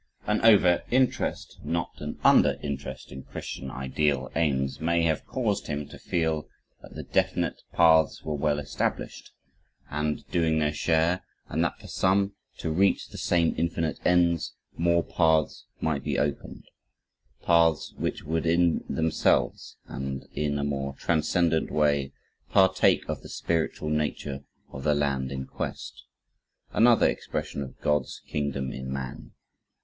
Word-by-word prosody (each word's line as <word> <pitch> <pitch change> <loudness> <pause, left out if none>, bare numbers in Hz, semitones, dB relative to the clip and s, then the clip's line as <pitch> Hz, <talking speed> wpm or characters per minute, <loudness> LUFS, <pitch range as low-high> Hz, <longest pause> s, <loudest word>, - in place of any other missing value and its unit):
An 105 0 +1
over 100 -6 +6
interest, 130 +1 0
not 85 0 -2
an - - -5
under - - +5
interest 70 -2 -5
in 65 +1 -7
Christian 65 0 -7
ideal 65 +1 -1
aims, 70 -4 0
may 85 +1 +2
have 80 -2 0
caused 105 -6 -1
him 75 -1 -3
to - - -11
feel 80 -3 -1 0.3
that - - -13
the - - -5
definite - - 0
paths 80 -2 +4
were 80 - -3
well 75 0 +1
established 70 -1 -3 0.6
and 75 -1 -2
doing 80 -2 +2
their 75 -1 +1
share, 80 +3 +1 0.3
and - - 0
that - - -1
for - - -16
some 100 +1 +1 0.2
to 80 - -3
reach 95 +4 +2
the - - -10
same 85 -2 +2
infinite 85 -1 -1
ends, 85 -2 +2 0.2
more 85 0 +2
paths 80 -3 +1 0.2
might 75 -4 -1
be - - -1
opened 75 -1 -2 0.8
paths 85 -2 +3
which - - -3
would 80 +2 -1
in 85 0 +3
themselves, 80 0 +1
and 65 0 -5
in 75 -1 -1
a 70 - -1
more 70 -1 -2
transcendent 80 +1 +1
way, 70 -3 +1 0.4
partake 95 -1 +4
of - - -3
the - - -11
spiritual 80 -2 -1
nature 75 -2 -2 0.3
of 65 - -7
the 75 -1 +3
land 70 -2 0
in 65 -1 -4
quest, - - -6 0.7
another 120 +1 +5
expression - - -3
of 65 - -8
God's 75 0 0
Kingdom 70 -2 -2
in 65 0 -6
Man. 65 -2 -6
75 Hz, 145 wpm, -27 LUFS, 70-85 Hz, 0.8 s, over